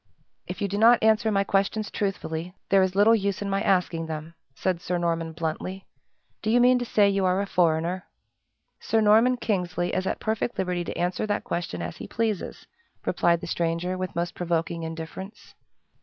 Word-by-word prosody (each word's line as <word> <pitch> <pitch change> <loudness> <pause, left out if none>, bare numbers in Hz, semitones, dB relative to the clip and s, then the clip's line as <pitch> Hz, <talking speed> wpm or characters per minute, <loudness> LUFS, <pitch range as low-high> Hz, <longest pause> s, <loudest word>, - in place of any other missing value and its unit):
"If - - -5
you - - +1
do 200 +1 -2
not 230 +1 +6
answer 220 0 +3
my 200 -1 +2
questions 200 +2 0
truthfully, 180 -3 -3
there 195 -1 +5
is 185 0 +1
little 210 +3 +6
use 200 -2 0
in 200 - -3
my 195 0 +1
asking 180 -5 +1
them," 160 +1 -6 0.2
said 185 -3 -1
Sir 180 0 -1
Norman, 165 -1 -1
bluntly. 165 +4 -4 0.6
"Do 215 - -2
you 240 +2 +4
mean 250 +1 +5
to 245 - -3
say 210 -3 +4
you 195 -1 +1
are 185 +1 +2
a 200 - 0
foreigner?" 175 0 +1 0.7
"Sir 225 - +1
Norman 220 +4 +5
Kingsley 180 -6 -1
is 185 0 -1
at - - -2
perfect 220 +2 -2
liberty 180 -2 -1
to - - -5
answer 180 +4 -1
that 205 - -1
question 90 - -3
as - - -6
he - - -8
pleases," 220 -4 -2 0.4
replied 170 -1 +2
the - - -5
stranger, 170 +2 -1
with 185 -2 -4
most 170 +1 -2
provoking 170 -1 -2
indifference. 165 +5 -8
185 Hz, 185 wpm, -26 LUFS, 170-205 Hz, 0.7 s, not